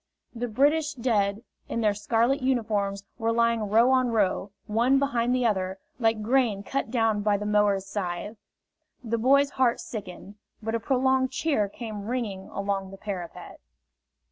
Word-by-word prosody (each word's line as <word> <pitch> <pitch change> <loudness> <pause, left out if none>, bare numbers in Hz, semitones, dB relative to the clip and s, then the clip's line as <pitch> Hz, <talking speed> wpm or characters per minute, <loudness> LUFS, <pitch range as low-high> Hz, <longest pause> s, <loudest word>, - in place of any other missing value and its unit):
The 245 0 -3
British 295 +6 +2
dead, 215 -4 0 0.3
in 230 - -2
their 210 -2 +3
scarlet 230 +6 +1
uniforms, 210 -6 0 0.2
were 225 0 +1
lying 230 -2 +1
row 230 +5 +5
on 255 -1 +3
row, 210 -3 0 0.2
one 235 +5 +3
behind 245 -4 +1
the 250 -1 +1
other, 190 -3 0 0.2
like 225 -2 +1
grain 230 -4 +2
cut 270 +2 -2
down 225 -3 +1
by 205 -1 +2
the 210 - -5
mower's 210 -2 +2
scythe. 195 +1 -4 0.7
The 230 0 -1
boy's 280 +4 +4
heart 250 -2 +2
sickened. 205 -1 -8 0.2
But 225 0 -4
a 230 - +1
prolonged 260 +2 +2
cheer 265 -6 0
came 215 -2 -7
ringing 220 -6 -3
along 200 -1 -3
the 195 - -10
parapet. 190 -5 -7
225 Hz, 155 wpm, -26 LUFS, 205-250 Hz, 0.7 s, row